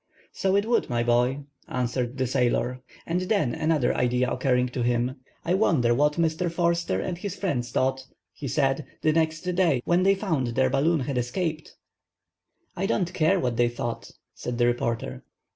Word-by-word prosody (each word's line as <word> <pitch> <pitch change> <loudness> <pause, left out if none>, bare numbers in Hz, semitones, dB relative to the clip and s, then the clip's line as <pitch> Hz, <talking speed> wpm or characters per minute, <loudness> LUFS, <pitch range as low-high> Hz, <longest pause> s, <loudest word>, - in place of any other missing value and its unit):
"So 190 0 0
it 200 +1 +2
would, 235 +1 +1
my 120 -1 0
boy," 120 +3 +2 0.3
answered 125 0 -2
the 130 - +1
sailor; 125 0 0 0.2
and 175 +2 -1
then 185 - +1
another 155 -5 +1
idea 125 +1 +1
occurring 125 -1 +1
to 125 0 -4
him:— 120 +2 0 0.3
"I 175 - +1
wonder 155 - +3
what 150 +4 +3
Mr. 165 +1 0
Forster 170 0 0
and 175 -2 -3
his 200 -1 -4
friend 145 -11 -1
thought," 130 +2 -1 0.3
he 140 - -6
said, 135 0 0 0.2
"the 155 - +3
next 160 -1 +1
day, 175 -8 +1
when 175 +1 +3
they 195 +1 +4
found 160 - -1
they 130 +3 +2
balloon 155 +4 +2
had 130 -1 -1
escaped?" 155 +6 -3 1.0
"I 190 +2 -1
don't 180 -4 0
care 170 +4 +3
what 125 -5 -1
they 120 0 +3
thought," 120 0 -5 0.2
said 120 -1 -5
the 120 - +3
reporter. 115 - -1
135 Hz, 175 wpm, -26 LUFS, 125-170 Hz, 1.0 s, they